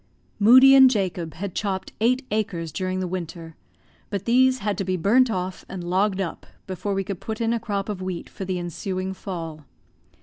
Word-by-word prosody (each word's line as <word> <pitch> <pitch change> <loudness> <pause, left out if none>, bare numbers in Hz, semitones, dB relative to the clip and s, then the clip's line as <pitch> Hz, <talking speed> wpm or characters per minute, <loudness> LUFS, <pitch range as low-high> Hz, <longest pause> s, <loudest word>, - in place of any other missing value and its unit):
Moodie 260 +6 +8
and 265 -1 +9
Jacob 185 -7 -2
had 190 +2 -5
chopped 195 -2 -3
eight 255 +4 +2
acres 180 -7 -2
during 185 +1 -2
the 185 - -2
winter, 170 -2 -6 0.5
but 200 -2 -4
these 255 +2 +4
had 210 -3 -2
to - - 0
be 185 0 -1
burnt 235 +9 +4
off 185 -3 -3
and 185 -2 -6
logged 190 +2 +1
up 185 -4 -4 0.2
before 195 +2 -3
we 195 - 0
could 190 -1 -5
put 220 -1 -5
in 230 0 +1
a 235 - 0
crop 200 -3 -3
of 205 -3 -4
wheat 185 -2 -4
for - - -8
the 185 -1 -2
ensuing 185 +2 -4
fall. 165 -5 -7
195 Hz, 195 wpm, -24 LUFS, 180-215 Hz, 0.5 s, and